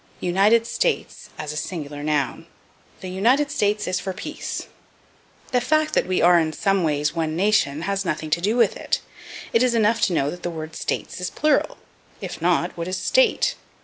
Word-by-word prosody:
United 200 Hz, +6 st, +3 dB
States -, -, -2 dB
as 150 Hz, 0 st, -4 dB
a -, -, -8 dB
Singular 150 Hz, -3 st, -5 dB
Noun. 145 Hz, -3 st, -1 dB, 0.5 s
"The 185 Hz, -, -6 dB
United 245 Hz, +10 st, +2 dB
States 210 Hz, 0 st, 0 dB
is 185 Hz, 0 st, 0 dB
for 190 Hz, -, -4 dB
peace." -, -, -5 dB, 0.9 s
The 250 Hz, -2 st, +2 dB
fact 310 Hz, +4 st, +1 dB
that -, -, +2 dB
we 185 Hz, -2 st, +1 dB
are 175 Hz, 0 st, +6 dB
in 160 Hz, -1 st, -1 dB
some 195 Hz, +1 st, +1 dB
ways 150 Hz, -1 st, 0 dB
one 160 Hz, -2 st, -2 dB
nation 170 Hz, -6 st, +2 dB
has 195 Hz, +1 st, -1 dB
nothing 155 Hz, -3 st, -3 dB
to 170 Hz, -, +2 dB
do 215 Hz, +6 st, +1 dB
with 240 Hz, -, +3 dB
it; -, -, -1 dB, 0.5 s
it 230 Hz, -, +4 dB
is 250 Hz, -2 st, +3 dB
enough 225 Hz, 0 st, +2 dB
to 180 Hz, -, -1 dB
know 145 Hz, -3 st, +1 dB
that 175 Hz, -, -9 dB
the -, -, -3 dB
word 160 Hz, -1 st, -7 dB
States -, -, -3 dB
is 180 Hz, -, -2 dB
plural 300 Hz, -1 st, +1 dB, 0.4 s
if -, -, -7 dB
not, -, -, +1 dB
what 170 Hz, 0 st, -4 dB
is 185 Hz, 0 st, -2 dB
State? -, -, +2 dB
185 Hz, 190 wpm, -23 LUFS, 160-225 Hz, 0.9 s, are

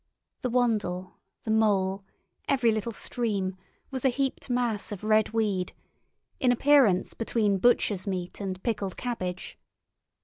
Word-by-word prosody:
The 250 Hz, -, -1 dB
Wandle, 210 Hz, -7 st, 0 dB, 0.2 s
the 220 Hz, -, -2 dB
Mole, 200 Hz, -3 st, +2 dB, 0.5 s
every 250 Hz, -4 st, +4 dB
little 220 Hz, +1 st, -2 dB
stream, 205 Hz, -4 st, -2 dB, 0.4 s
was 260 Hz, -2 st, -3 dB
a 265 Hz, -, +5 dB
heaped 270 Hz, +1 st, -2 dB
mass 240 Hz, -5 st, 0 dB
of 205 Hz, -1 st, -6 dB
red 215 Hz, 0 st, +3 dB
weed, 210 Hz, -5 st, -1 dB, 0.7 s
in 255 Hz, -2 st, +4 dB
appearance 245 Hz, -7 st, +4 dB
between 215 Hz, -4 st, 0 dB
butcher's 205 Hz, -3 st, +2 dB
meat 180 Hz, 0 st, -4 dB
and 185 Hz, -1 st, -4 dB
pickled 200 Hz, -5 st, -2 dB
cabbage. 185 Hz, -7 st, -4 dB
215 Hz, 130 wpm, -27 LUFS, 190-245 Hz, 0.7 s, a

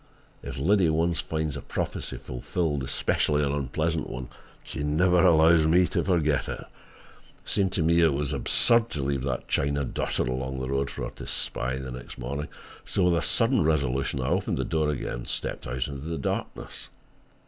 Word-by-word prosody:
If 70 Hz, -2 st, -6 dB
Liddy 90 Hz, +4 st, +3 dB
once 85 Hz, +2 st, +1 dB
finds 80 Hz, -2 st, -2 dB
a -, -, -5 dB
prophecy -, -, -4 dB
fulfilled, 75 Hz, +3 st, -2 dB
especially 75 Hz, +2 st, +1 dB
an 70 Hz, -, +1 dB
unpleasant 75 Hz, +4 st, -1 dB
one, 65 Hz, -1 st, -6 dB, 0.3 s
she -, -, -6 dB
never 85 Hz, +5 st, +3 dB
allows 80 Hz, -2 st, +6 dB
me 90 Hz, +3 st, +5 dB
to -, -, 0 dB
forget 80 Hz, -6 st, +1 dB
it. -, -, -4 dB
It -, -, -11 dB, 0.8 s
seemed 95 Hz, -2 st, +1 dB
to 85 Hz, -, +1 dB
me 85 Hz, +1 st, +4 dB
that 85 Hz, -, +6 dB
it 75 Hz, -, +1 dB
was 70 Hz, -1 st, -1 dB
absurd 115 Hz, 0 st, +3 dB
to 70 Hz, -3 st, -3 dB
leave 70 Hz, -1 st, -1 dB
that 65 Hz, -2 st, -3 dB
china 70 Hz, 0 st, 0 dB
dotted -, -, -1 dB
along 65 Hz, +1 st, -3 dB
the 65 Hz, 0 st, -3 dB
road 70 Hz, 0 st, 0 dB
for -, -, -6 dB
her -, -, -4 dB
to -, -, -8 dB
spy 65 Hz, +1 st, -2 dB
the 65 Hz, -1 st, -5 dB
next 60 Hz, -1 st, -9 dB
morning; 70 Hz, +4 st, -4 dB, 0.4 s
so 95 Hz, -, 0 dB
with 90 Hz, -1 st, +4 dB
a 85 Hz, -, +1 dB
sudden 115 Hz, -3 st, +3 dB
resolution, 70 Hz, -4 st, 0 dB
I 65 Hz, +1 st, -1 dB
opened 90 Hz, +3 st, 0 dB
the -, -, -1 dB
door 80 Hz, -2 st, 0 dB
again 75 Hz, -, -2 dB
and -, -, -6 dB
stepped -, -, -4 dB
out 65 Hz, +1 st, -2 dB
into 70 Hz, -1 st, -6 dB
the 85 Hz, 0 st, -2 dB
darkness. -, -, -4 dB
75 Hz, 195 wpm, -27 LUFS, 65-85 Hz, 0.8 s, allows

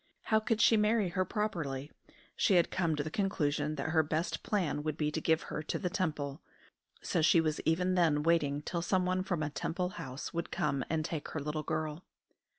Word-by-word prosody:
How 220 Hz, -, +3 dB
could 220 Hz, 0 st, 0 dB
she 225 Hz, -, +6 dB
marry 210 Hz, -2 st, +2 dB
her 185 Hz, +2 st, 0 dB
properly? 155 Hz, -11 st, -2 dB, 0.4 s
She 200 Hz, -, +3 dB
had 170 Hz, -1 st, +4 dB
come 170 Hz, -4 st, +1 dB
to 145 Hz, -, -1 dB
the 155 Hz, -, -5 dB
conclusion 150 Hz, -6 st, 0 dB
that 150 Hz, +2 st, -3 dB
her 160 Hz, -1 st, +5 dB
best 155 Hz, +3 st, -2 dB
plan 180 Hz, -9 st, 0 dB
would 155 Hz, 0 st, -3 dB
be 150 Hz, -1 st, 0 dB
to 160 Hz, -, -2 dB
give 160 Hz, 0 st, +2 dB
her -, -, -4 dB
to 155 Hz, -, -3 dB
the 180 Hz, -3 st, -2 dB
Temple. 155 Hz, -6 st, -2 dB, 0.6 s
So 175 Hz, -, +1 dB
she 160 Hz, +2 st, +5 dB
was 155 Hz, -2 st, 0 dB
even 180 Hz, +3 st, +2 dB
then 160 Hz, -5 st, +3 dB
waiting 150 Hz, -3 st, +2 dB
till 170 Hz, +2 st, -2 dB
someone 185 Hz, +1 st, +1 dB
from 175 Hz, -4 st, -1 dB
a 150 Hz, -, -2 dB
Temple 180 Hz, +4 st, -2 dB
house 135 Hz, -6 st, -6 dB
would 170 Hz, 0 st, -3 dB
come 140 Hz, -3 st, 0 dB
and 155 Hz, -1 st, 0 dB
take 160 Hz, -3 st, -4 dB
her 155 Hz, -, -4 dB
little 150 Hz, +2 st, -2 dB
girl. 155 Hz, +1 st, -3 dB
160 Hz, 205 wpm, -32 LUFS, 150-185 Hz, 0.6 s, she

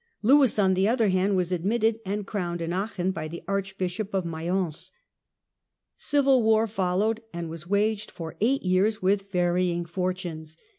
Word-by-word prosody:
Lewis, 265 Hz, 0 st, +5 dB
on 190 Hz, -2 st, +4 dB
the 190 Hz, +2 st, +2 dB
other 225 Hz, -2 st, +2 dB
hand, 190 Hz, +2 st, +2 dB
was 180 Hz, -1 st, 0 dB
admitted 220 Hz, +5 st, +1 dB
and 205 Hz, +1 st, -2 dB
crowned 175 Hz, -5 st, -3 dB
in 165 Hz, +1 st, -3 dB
Aachen 190 Hz, -1 st, -1 dB
by 155 Hz, -4 st, -5 dB
'the 170 Hz, +2 st, -8 dB
Archbishop 195 Hz, +1 st, -3 dB
of 190 Hz, -2 st, 0 dB
Mayence. 170 Hz, 0 st, -2 dB, 1.0 s
Civil 275 Hz, -3 st, +3 dB
war 220 Hz, 0 st, +4 dB
followed 205 Hz, +2 st, 0 dB
and 170 Hz, -1 st, -5 dB
was 165 Hz, 0 st, -8 dB
waged 210 Hz, +2 st, 0 dB
for 165 Hz, -2 st, -8 dB
eight 265 Hz, +5 st, +2 dB
years 190 Hz, +3 st, +1 dB
with 195 Hz, +1 st, +1 dB
varying 175 Hz, -1 st, +1 dB
fortunes. 170 Hz, -3 st, -4 dB
190 Hz, 155 wpm, -26 LUFS, 175-215 Hz, 1.0 s, Lewis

